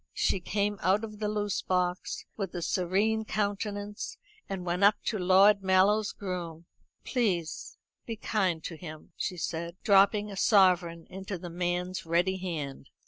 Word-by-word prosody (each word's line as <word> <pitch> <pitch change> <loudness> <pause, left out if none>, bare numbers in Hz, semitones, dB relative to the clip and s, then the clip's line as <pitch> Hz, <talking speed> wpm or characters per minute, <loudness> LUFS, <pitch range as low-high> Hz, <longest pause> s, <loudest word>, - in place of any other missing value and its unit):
She 195 - +1
came 205 +3 -1
out 195 +4 +2
of 215 -2 -7
the 210 - -1
loose 205 -1 -1
box 180 -1 -1
with 195 -4 -4
a 175 - -3
serene 200 +6 +1
countenance, 205 -1 -3 0.3
and 190 -2 -4
went 175 +2 0
up 205 +1 +7
to 215 - -1
Lord 195 +3 +5
Mallow's 195 +3 +3
groom. 175 -4 -6 0.4
"Please 185 - -1 0.3
be 230 - -3
kind 190 -6 0
to 165 - -5
him," 155 -2 -10
she 180 - -3
said, 170 +1 -4
dropping 205 0 +4
a - - -6
sovereign 180 -5 +3
into 190 0 -5
the 175 0 -8
man's 180 +1 -2
ready 175 +3 +1
hand. 155 -7 -5
190 Hz, 150 wpm, -29 LUFS, 175-205 Hz, 0.4 s, up